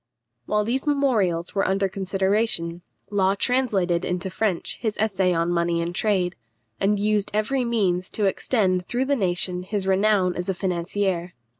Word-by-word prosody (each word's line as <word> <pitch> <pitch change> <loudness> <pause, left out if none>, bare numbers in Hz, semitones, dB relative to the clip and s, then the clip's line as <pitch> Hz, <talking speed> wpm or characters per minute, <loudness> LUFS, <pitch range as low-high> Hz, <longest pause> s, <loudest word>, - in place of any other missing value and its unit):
While 210 0 +1
these 255 +6 -2
memorials 220 - +1
were 195 -1 +1
under 195 +1 +1
consideration, 190 -2 0 0.3
Law 195 -1 +2
translated 195 -8 +1
into 180 +1 -2
French 195 -3 -1
his 220 -3 -2
essay 195 -4 +1
on 170 0 +1
money 170 -1 +1
and 170 +1 -2
trade, 185 -3 +1 0.5
and 205 +1 +2
used 210 0 +1
every 250 +5 +1
means 190 -6 0
to 210 - +2
extend 190 -3 +1
through 250 +2 0
the 280 +1 +2
nation 180 -4 0
his 195 +1 -3
renown 190 -1 +2
as 180 +2 -4
a 190 - 0
financier. 180 0 -2
195 Hz, 155 wpm, -24 LUFS, 180-215 Hz, 0.5 s, Law